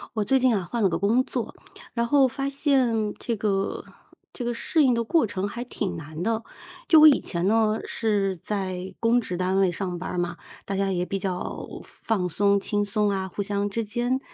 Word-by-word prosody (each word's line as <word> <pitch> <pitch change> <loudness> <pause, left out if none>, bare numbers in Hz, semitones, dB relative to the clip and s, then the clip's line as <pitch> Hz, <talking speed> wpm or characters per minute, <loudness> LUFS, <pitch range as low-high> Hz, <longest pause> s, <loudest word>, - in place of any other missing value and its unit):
我 215 - 0
最 270 - +3
近 255 -1 +3
啊， 190 -5 -1
换 235 -2 -1
了 195 - +4
个 165 -1 -1
工 220 +7 +3
作， - - -4 0.4
然 235 -1 0
后 275 +1 +4
发 275 +2 -3
现 255 -7 +1
这 235 - -3
个 195 -1 -1 0.5
这 250 - -5
个 240 0 -1
适 305 +6 +1
应 260 -3 +4
的 235 0 0
过 320 +3 +3
程 200 -2 -3
还 235 +4 -5
挺 210 -6 -4
难 155 0 -7
的。 225 +4 -1 0.5
就 320 - +8
我 310 - +10
以 295 - +7
前 170 +1 -2
呢， 220 0 +2
是 200 -4 0
在 185 0 -4
公 235 +2 +3
职 180 -6 -4
单 185 +1 0
位 190 -2 +3
上 180 0 -3
班 180 - -5
儿 - - -4
嘛， 175 0 -1 0.3
大 195 - -3
家 195 0 0
也 180 -1 -1
比 195 - -2
较 185 -2 -4 0.2
放 225 -2 -3
放 180 - 0
松、 200 +3 +2
轻 205 +1 0
松 205 +1 0
啊， 190 -1 -2
互 205 - -4
相 200 0 -1
之 225 +2 -2
间， 240 +5 -1
205 Hz, 235 characters per minute, -25 LUFS, 190-235 Hz, 0.5 s, 我